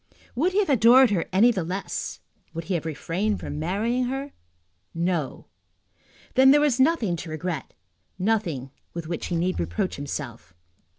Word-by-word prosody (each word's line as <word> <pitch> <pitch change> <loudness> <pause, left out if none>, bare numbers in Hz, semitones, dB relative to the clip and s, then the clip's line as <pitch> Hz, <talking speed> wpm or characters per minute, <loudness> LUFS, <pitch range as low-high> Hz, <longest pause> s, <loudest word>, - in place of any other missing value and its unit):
Would 340 +9 +1
he - - 0
have 415 -5 +2
adored 250 0 +6
her 180 -5 +1
any 215 +6 +5
the 190 -7 -2
less? 185 +4 -4 0.3
Would 165 - -3
he 185 - -3
have 165 -2 -2
refrained 180 +7 -2
from 150 - -5
marrying 220 +10 0
her? 270 +3 -4 0.6
No. 170 -5 -2 0.9
Then 265 0 +6
there 290 +2 +7
was 290 -4 +2
nothing 260 - +3
to 165 - -7
regret, 155 -1 -4 0.4
nothing 180 - -1 0.2
with 170 -1 -4
which 170 0 -4
he 175 - -2
need 180 +2 0
reproach 85 - -2
himself. 120 -9 -6
185 Hz, 160 wpm, -25 LUFS, 165-245 Hz, 0.9 s, there